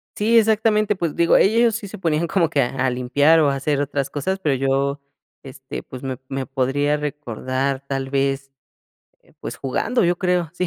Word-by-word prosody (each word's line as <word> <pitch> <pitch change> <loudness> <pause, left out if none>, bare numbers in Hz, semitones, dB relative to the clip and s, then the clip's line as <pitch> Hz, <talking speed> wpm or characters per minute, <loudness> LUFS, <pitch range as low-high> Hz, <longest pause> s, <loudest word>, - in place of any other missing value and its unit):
Sí, 225 +3 +3
exactamente, 215 -1 +3
pues 170 -4 -2
digo, 170 0 +4
ellos 230 +2 +3
sí 220 -4 -5
se 210 - -9
ponían 165 -2 0
como 170 -3 +1
que 145 -4 +1
a 130 +2 -1
a - - +3
limpiar, 140 +6 +3
o, 150 -3 +4
a 140 - 0
hacer 140 +1 -1
otras 140 -1 -2
cosas, 190 +7 -2
pero 150 -7 +1
yo, 135 +2 0 0.4
este, 135 0 -8
pues, 130 0 -10
me 130 -2 -4
me 135 0 -4
podría 140 +2 0
recordar 135 -1 -3
tal 135 -1 -3
vez, 135 0 -1 0.7
eh, - - -26
pues, - - -6
jugando, 225 - 0
yo 175 +1 +2
creo, 180 -4 0
sí, 180 +1 -2
145 Hz, 190 wpm, -21 LUFS, 135-180 Hz, 0.7 s, digo